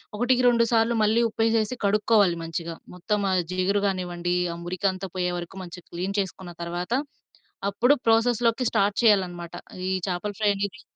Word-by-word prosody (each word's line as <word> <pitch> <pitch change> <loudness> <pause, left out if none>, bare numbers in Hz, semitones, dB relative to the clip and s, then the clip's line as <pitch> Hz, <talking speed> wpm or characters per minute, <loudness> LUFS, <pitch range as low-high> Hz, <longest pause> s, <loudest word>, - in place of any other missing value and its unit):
ఒకటికి 245 +3 +2
రెండు 235 -1 +4
సార్లు 230 0 +3
మళ్ళీ 220 +2 +3
ఉప్పు 225 - -4
వేసేసి 225 +1 +1
కడుక్కోవాలి 205 -2 +3
మంచిగా. 165 0 -4 0.2
మొత్తం 205 +3 -1
ఆ - - +2 0.2
జీగురు 195 +2 +1
కానివ్వండి, 175 -2 -2 0.2
ఆ - - -7
మురికంతా 185 +1 -2
పోయేవరకు 180 0 -3
మంచిగా 175 0 -10
క్లీన్ 190 +4 -3
చేసుకున్న 185 -2 -7
తర్వాత 175 +3 -4 0.8
అప్పుడు 250 +7 +4
ప్రాసెస్‌లోకి 230 +1 +3
స్టార్ట్ 200 +1 +1
చేయాలనమాట. 180 -5 +2 0.4
ఈ - - +1 0.2
చాపల 185 +4 -3
ఫ్రై 210 -1 +3
అనేది. 200 +6 -4
200 Hz, 150 wpm, -25 LUFS, 180-225 Hz, 0.8 s, రెండు